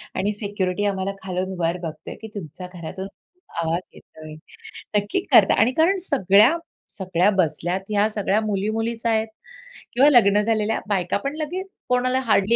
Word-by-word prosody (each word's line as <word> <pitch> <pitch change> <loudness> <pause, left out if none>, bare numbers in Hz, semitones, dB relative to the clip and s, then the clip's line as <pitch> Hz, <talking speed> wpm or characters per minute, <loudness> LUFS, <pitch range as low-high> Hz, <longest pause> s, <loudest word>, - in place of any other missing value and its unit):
आणि 200 +2 0
सिक्युरिटी 205 -2 -2
आम्हाला 195 -1 -1
खालून 185 0 -3
वर 170 +1 0
बघतोय 155 -2 -7
की 220 - -7
तुमच्या 180 -1 -7
घरातून 180 +2 -6 0.5
आवाज 165 +1 -1
येतोय. 155 -1 -13 0.6
नक्की 205 - 0
करता - - +7
आणि 245 - +4
कारण 340 +5 +4
सगळ्या, 240 - +4 0.3
सगळ्या 185 0 +1
बसल्यात 175 +1 0
ह्या 210 0 +3
सगळ्या 210 -1 0
मुली-मुलीच 220 +3 -2
आहेत 220 -1 +2 0.7
किंवा 270 +4 +6
लग्न 210 -6 +5
झालेल्या 220 0 0
बायका 185 -3 0
पण 280 +2 -2
लगेच 355 +5 -4 0.2
कोणाला 255 +1 +2
हार्डली 210 +2 +4
205 Hz, 145 wpm, -23 LUFS, 185-225 Hz, 0.7 s, करता